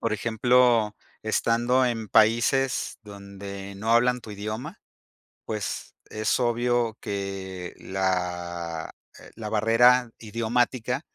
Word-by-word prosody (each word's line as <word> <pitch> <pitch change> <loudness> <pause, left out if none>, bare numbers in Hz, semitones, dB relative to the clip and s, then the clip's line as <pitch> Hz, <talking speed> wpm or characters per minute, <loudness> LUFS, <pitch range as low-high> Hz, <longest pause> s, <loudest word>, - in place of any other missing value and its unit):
Por 115 -1 -1
ejemplo, 115 0 +3 0.3
estando 120 +3 +2
en 115 -3 -2
países 120 +6 +2
donde 100 -1 -9
no 110 +3 0
hablan 125 +1 +3
tu 110 - -11
idioma, 110 - -6 0.7
pues 105 -1 -4 0.2
es 110 +3 0
obvio 120 -1 +1
que 95 -3 -5
la, 90 -3 -3 0.2
eh, - - -14
la 110 -1 -6
barrera 115 +3 +4
idiomática 120 +3 -1
110 Hz, 100 wpm, -26 LUFS, 100-120 Hz, 0.7 s, barrera